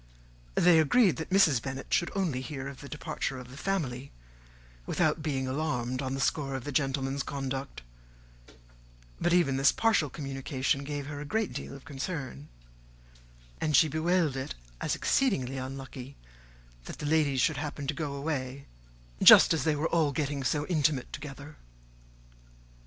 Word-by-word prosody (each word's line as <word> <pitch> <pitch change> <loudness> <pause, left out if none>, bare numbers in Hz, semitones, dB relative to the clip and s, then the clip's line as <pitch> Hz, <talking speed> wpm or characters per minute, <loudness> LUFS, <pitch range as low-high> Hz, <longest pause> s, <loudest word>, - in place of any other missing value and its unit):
They 175 -2 +6
agreed 185 - +4
that 160 - -5
Mrs. 165 -10 +4
Bennet 135 0 -5
should 175 - +2
only 170 -10 0
hear 135 -1 -6
of 140 -1 -9
the 140 - -9
departure 140 -2 -4
of 125 -1 -10
the - - -10
family, 140 -7 -3 0.8
without 155 -2 +1
being 135 -4 -2
alarmed 130 -3 -2
on 130 0 -2
the - - -4
score 135 0 0
of 130 - -4
the 145 - -5
gentleman's 135 -1 0
conduct; 135 - -4 1.4
but 175 - +1
even 170 -7 +3
this 135 +1 +5
partial 220 -10 +2
communication 135 -1 -2
gave 145 0 -4
her 145 0 -6
a - - -5
great 220 +8 -1
deal - - -6
of 140 - -13
concern, 135 - -5 1.1
and 155 -2 +1
she 160 - +6
bewailed 160 -1 +1
it 130 - -4 0.3
as - - 0
exceedingly 135 - +1
unlucky 130 0 -7 0.7
that - - -8
the - - -6
ladies 145 -4 +2
should 155 - +2
happen 145 -1 -4
to 140 - -1
go 145 -2 -4
away 140 -2 -3 0.6
just - - +9
as 160 - -1
they 155 -2 +2
were 155 +3 -1
all 160 -4 +2
getting 140 -1 -2
so 145 +3 0
intimate 150 -6 0
together. 145 +1 -8
140 Hz, 155 wpm, -29 LUFS, 135-155 Hz, 1.4 s, just